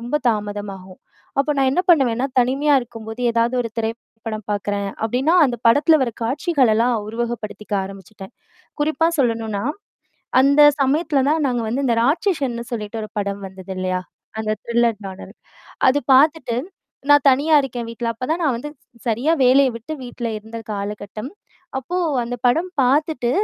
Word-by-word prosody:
ரொம்ப 245 +6 -1
தாமதமாகும். 205 -3 -4 0.4
அப்போ 280 +2 +2
நான் 270 -1 +3
என்னா 355 +7 +1
பண்ணுவேன்னா? 260 -6 +3
தனிமையா 270 +4 +3
இருக்கும்போது 225 -1 -9
ஏதாவது 230 +2 +1
ஒரு 230 - -5
திரைப்படம் 225 -1 -5
பாக்குறேன் 205 -1 -2 0.2
அப்டின்னா, 260 +9 +1
அந்த 240 -2 -2
படத்தில 295 +6 +5
வர 240 -3 -1
காட்சிகளெல்லாம் 250 -3 +2
உருவகப்படுத்திக்க 220 -3 -4
ஆரம்பிச்சுட்டேன். 195 0 -11 0.5
குறிப்பா 315 +2 +2
சொல்லணுன்னா, 225 -5 0 0.8
அந்த 280 +2 +5 0.2
சமயத்துல 280 0 +2
தான் 310 0 +1
நாங்க 245 -2 -1
வந்து 265 +5 -1
இந்த 235 - +2
ராட்சசன்னுன்னு 275 - 0
சொல்லிட்டு 220 0 -4
ஒரு 215 - -8
படம் 200 0 -3
வந்தது 190 0 -9
இல்லையா? 185 0 -1 0.4
அந்த 215 -1 -1
த்ரில்லர் 235 -2 +1
நோடல் 190 0 -10 0.6
அது 265 - +4 0.2
பாத்துட்டு, 275 -3 +3 0.5
நான் 290 0 +6
தனியா 290 +4 +2
இருக்கேன் 240 -3 -5
வீட்ல. 230 0 -5
அப்பதான் 280 +9 -2
நான் 275 -5 +2
வந்து 295 - -6 0.4
சரியா 240 +8 +1
வேலைய 265 +2 +5
விட்டு 235 +7 -8
வீட்ல 240 -1 -5
இருந்த 220 +2 -10 0.2
காலகட்டம். 205 +2 -5 0.5
அப்போ 305 +8 -5 0.3
அந்த 235 +1 -4
படம் 325 +9 +2
பாத்துட்டு, 270 -1 +1
240 Hz, 140 wpm, -21 LUFS, 215-275 Hz, 0.8 s, நான்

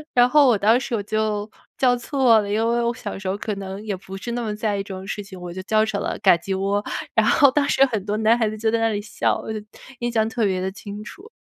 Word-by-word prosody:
然 245 0 +6
后 290 +2 +5
我 235 -5 +4
当 220 +5 +4
时 245 -2 -3
我 205 - -2
就 215 0 -1 0.3
叫 250 -2 +3
错 245 -2 +3
了， 200 - -5
因 205 - 0
为 235 0 +1
我 235 0 0
小 210 -5 -6
时 195 - -6
候 190 +2 -1
可 210 0 -3
能 195 0 -6
也 205 -3 -2
不 190 +1 -9
是 235 +4 -6
那 240 - -2
么 215 -2 -3
在 210 -1 -1
意 195 - -2
这 195 -1 -8
种 190 - -8
事 205 +1 -4
情， 190 -2 -11
我 175 -1 -7
就 185 - -6
叫 215 +2 +2
成 205 -2 -3
了 - - -3
噶 - - +7
叽 190 +2 -3
窝。 200 +1 0 0.3
然 - - +3
后 280 -4 +5
当 285 +1 +1
时 275 - +5
很 220 -7 -3
多 210 +1 -1
男 220 +2 +3
孩 225 -2 +1
子 215 - -6
就 220 0 0
在 230 - +1
那 225 - +2
里 210 -2 -1
笑， 210 - -1
我 220 - -5
就 215 - -3 0.4
印 240 0 -2
象 220 -2 +1
特 225 -1 -1
别 185 -2 0
地 190 +1 -2
清 205 +1 -8
楚。 390 - -12
215 Hz, 315 characters per minute, -22 LUFS, 200-235 Hz, 0.4 s, 噶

